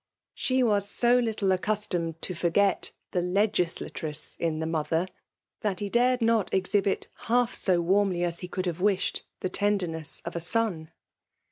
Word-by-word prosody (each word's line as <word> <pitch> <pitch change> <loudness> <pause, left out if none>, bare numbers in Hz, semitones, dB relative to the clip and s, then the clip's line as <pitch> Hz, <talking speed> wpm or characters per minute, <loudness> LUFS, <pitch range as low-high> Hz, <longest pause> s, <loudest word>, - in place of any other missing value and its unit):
She 255 0 +1
was 205 -3 +2
so 245 +3 +3
little 220 -5 0
accustomed 180 -4 -1
to 185 - -2
forget 180 +4 +2 0.2
the 180 - +1
legislatress 175 -5 -1
in 165 -2 0
the 160 - -2
mother, 160 +1 0 0.5
that 200 -4 -1
he 205 - -3
dared 245 +2 +3
not 225 -4 +2
exhibit 195 +1 +1 0.2
half 245 0 +3
so 180 -3 +2
warmly 185 0 +2
as 170 -1 -1
he 180 - -6
could 185 +1 -3
hare 175 - 0
wished 190 +3 +1 0.2
the 185 - -1
tenderness 180 -7 -1
of - - -5
a - - 0
son. 175 -3 0
190 Hz, 155 wpm, -27 LUFS, 170-210 Hz, 0.5 s, so